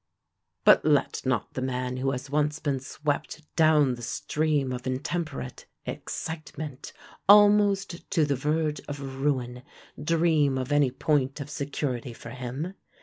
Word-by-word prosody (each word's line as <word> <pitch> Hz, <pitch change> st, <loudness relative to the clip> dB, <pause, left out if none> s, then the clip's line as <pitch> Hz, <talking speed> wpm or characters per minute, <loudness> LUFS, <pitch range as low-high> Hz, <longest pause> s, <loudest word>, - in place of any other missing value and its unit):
But -, -, +7 dB
let 145 Hz, -3 st, +2 dB
not 125 Hz, -5 st, 0 dB
the 130 Hz, -, -3 dB
man 125 Hz, -1 st, -2 dB
who 135 Hz, +1 st, 0 dB
has 135 Hz, +1 st, -3 dB
once 150 Hz, +1 st, +1 dB
been 145 Hz, -4 st, -1 dB
swept 145 Hz, +3 st, -3 dB
down 155 Hz, -5 st, +5 dB
the 120 Hz, -, -8 dB
stream 150 Hz, +2 st, 0 dB
of 125 Hz, +1 st, -5 dB
intemperate 130 Hz, -, -4 dB, 0.2 s
excitement, 155 Hz, -3 st, -6 dB, 0.4 s
almost 205 Hz, -3 st, +5 dB
to 160 Hz, -, +3 dB
the 140 Hz, -1 st, 0 dB
verge 150 Hz, +3 st, 0 dB
of 135 Hz, -2 st, -6 dB
ruin, 125 Hz, -4 st, -1 dB, 0.4 s
dream 155 Hz, -4 st, +3 dB
of 130 Hz, +2 st, -3 dB
any 145 Hz, -2 st, +4 dB
point 135 Hz, +1 st, 0 dB
of 145 Hz, +1 st, -6 dB
security 140 Hz, -4 st, -3 dB
for 115 Hz, 0 st, -10 dB
him. 130 Hz, +8 st, -5 dB
145 Hz, 140 wpm, -27 LUFS, 130-155 Hz, 0.4 s, But